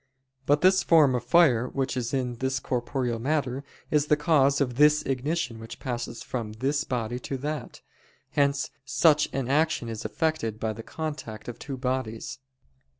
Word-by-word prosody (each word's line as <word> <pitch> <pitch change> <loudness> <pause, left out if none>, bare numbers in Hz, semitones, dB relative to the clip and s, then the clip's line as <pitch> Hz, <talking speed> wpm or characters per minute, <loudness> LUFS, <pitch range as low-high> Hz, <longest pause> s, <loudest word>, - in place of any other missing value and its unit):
But 145 +1 +4
this 190 +1 +5
form 155 -6 +5
of 125 -2 -1
fire 125 -4 +4
which 135 -1 -2
is 125 -1 -2
in 125 -3 -1
this 130 +1 -1
corporeal 125 -2 -2
matter, 135 0 -1 0.3
is 150 -1 +2
the 150 - +4
cause 145 -3 +3
of 125 -4 -1
this 150 +1 +5
ignition 135 -2 -2
which 115 +1 -9
passes 120 -2 -4
from 115 -4 -4
this 140 +6 0
body 120 -3 -3
to 135 +2 -4
that. 150 +3 -5 0.5
Hence 140 -2 +1
such 150 +2 +3
an 135 -3 -2
action 150 -3 +1
is 110 -2 -5
effected 155 -10 -1
by 110 -1 -1
the 110 - -8
contact 145 -7 -6
of 120 - -7
two 135 -2 -6
bodies. 125 -3 -3
130 Hz, 165 wpm, -27 LUFS, 120-150 Hz, 0.5 s, this